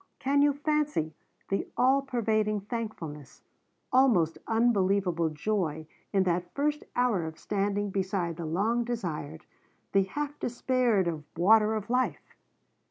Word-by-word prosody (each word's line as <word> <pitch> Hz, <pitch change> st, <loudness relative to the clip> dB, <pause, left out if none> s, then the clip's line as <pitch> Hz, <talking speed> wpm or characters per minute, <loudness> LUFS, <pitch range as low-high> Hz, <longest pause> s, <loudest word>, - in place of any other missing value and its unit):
Can 280 Hz, +1 st, +2 dB
you 290 Hz, 0 st, +4 dB
fancy 295 Hz, -, 0 dB, 0.4 s
the 195 Hz, -, -1 dB
all 265 Hz, +3 st, +4 dB
pervading 215 Hz, -5 st, 0 dB
thankfulness, 195 Hz, -, -6 dB, 0.5 s
almost 225 Hz, -12 st, +4 dB
unbelievable 195 Hz, -7 st, +2 dB
joy, 160 Hz, -1 st, -2 dB, 0.3 s
in 195 Hz, -2 st, +3 dB
that 175 Hz, -1 st, -1 dB
first 295 Hz, +1 st, 0 dB
hour 245 Hz, -8 st, +2 dB
of 160 Hz, 0 st, -8 dB
standing 205 Hz, 0 st, -1 dB
beside 185 Hz, -3 st, -1 dB
the 170 Hz, -, -4 dB
long 215 Hz, +9 st, +1 dB
desired, 175 Hz, -9 st, -4 dB, 0.5 s
the 195 Hz, -1 st, +3 dB
half 290 Hz, +8 st, -4 dB
despaired 245 Hz, -5 st, +1 dB
of 160 Hz, -3 st, -3 dB
water 215 Hz, +4 st, +5 dB
of 215 Hz, -1 st, -4 dB
life? 255 Hz, +1 st, -1 dB
205 Hz, 125 wpm, -29 LUFS, 175-245 Hz, 0.5 s, water